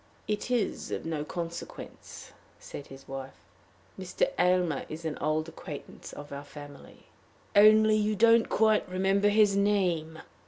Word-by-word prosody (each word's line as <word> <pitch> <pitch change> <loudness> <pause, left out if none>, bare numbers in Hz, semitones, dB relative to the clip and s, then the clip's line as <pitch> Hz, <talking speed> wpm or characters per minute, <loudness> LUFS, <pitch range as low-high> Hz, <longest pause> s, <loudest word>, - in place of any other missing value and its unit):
"It 210 +3 -2
is 240 -5 -1
of - - -4
no 160 -2 -2
consequence," 170 +1 -8 0.3
said 145 - -10
his 135 0 -13
wife; 135 0 -7 0.6
"Mr. - - -1
Aylmer 180 -5 +2
is 160 +2 -7
an 155 -2 -2
old 155 +1 -1
acquaintance 165 -2 -9
of 145 0 -10
our 140 0 -6
family." 145 -1 -13 0.5
"Only 215 +1 +6
you 215 0 0
don't 230 +2 +4
quite 215 -3 +2
remember 195 +2 +2
his 205 -1 +4
name!" 180 -6 +1
180 Hz, 135 wpm, -28 LUFS, 155-210 Hz, 0.6 s, Only